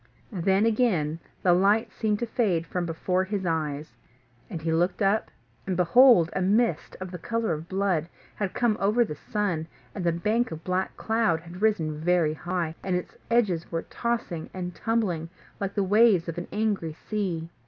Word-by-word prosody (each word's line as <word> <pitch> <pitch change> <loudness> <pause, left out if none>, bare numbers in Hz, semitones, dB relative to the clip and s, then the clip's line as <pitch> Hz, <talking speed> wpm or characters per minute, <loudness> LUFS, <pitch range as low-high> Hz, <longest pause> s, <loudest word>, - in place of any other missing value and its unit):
Then 195 +2 +2
again 195 -10 +1 0.2
the 180 - +5
light 200 +5 +3
seemed 215 -2 0
to 235 - -2
fade 200 -8 0
from 175 0 -3
before 180 +3 0
his 195 -1 -3
eyes, 150 -6 -2 0.5
and 170 - -5
he 160 0 -1
looked 175 +3 +1
up, 205 +1 +2 0.4
and, 185 -2 -1
behold, 180 -1 +6
a 190 - -1
mist, 205 -2 +1
of 185 -1 -6
the 180 - -6
colour 230 0 -1
of 155 +2 -6
blood, 185 -4 0 0.2
had 200 -3 -3
come 235 -3 +2
over 215 +5 +3
the 175 - -5
sun; 175 -1 -2 0.3
and 190 - -4
the 170 - +3
bank 215 +8 0
of 160 0 -7
black 185 +1 -2
cloud 220 -8 +1
had 175 +3 -11
risen 160 -9 +1
very 170 -2 +2
high, 175 0 -3
and 185 -2 -1
its 180 - -4
edges 210 -8 +1
were 165 -1 -2
tossing 230 -9 -3
and 180 -1 -4
tumbling 185 -6 -1 0.3
like 200 -1 -3
the 200 - +2
waves 205 -3 +4
of 170 +1 -3
an 175 - -6
angry 205 -7 -1
sea. 175 -3 -3
185 Hz, 180 wpm, -26 LUFS, 165-215 Hz, 0.5 s, behold